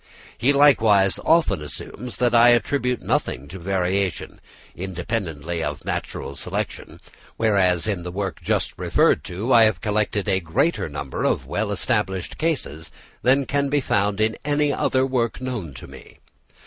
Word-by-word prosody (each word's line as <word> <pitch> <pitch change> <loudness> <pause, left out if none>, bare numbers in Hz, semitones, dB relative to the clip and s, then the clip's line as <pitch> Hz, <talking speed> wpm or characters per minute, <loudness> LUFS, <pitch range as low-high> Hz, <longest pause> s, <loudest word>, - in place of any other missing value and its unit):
He 125 +4 +2
likewise 110 -9 +4
often 165 - +3
assumes 105 - -8
that 120 -1 +1
I 120 +1 +7
attribute 125 +1 +1
nothing 65 +3 -1
to 95 - -8
variation, 95 +1 -2 0.3
independently 85 -3 -4
of - - -4
natural 70 - -4
selection, - - -5 0.4
whereas 95 -6 +2
in 100 -5 -1
the 90 - -6
work 95 +1 -4
just - - -1
referred - - +2
to 105 +9 -2
I 115 -2 +8
have 110 -6 +1
collected 105 0 -1
a 95 -2 +2
greater 95 - 0
number 70 -2 -5
of - - 0
well - - -2
established 95 -2 -2
cases 125 - -2 0.3
than 135 +2 +3
can 140 +1 0
be 145 +1 +2
found 100 -5 0
in 110 +1 +1
any 145 0 +1
other 130 0 +1
work 125 -3 -1
known 125 - -4
to - - -9
me. - - -14
105 Hz, 150 wpm, -23 LUFS, 90-125 Hz, 0.4 s, I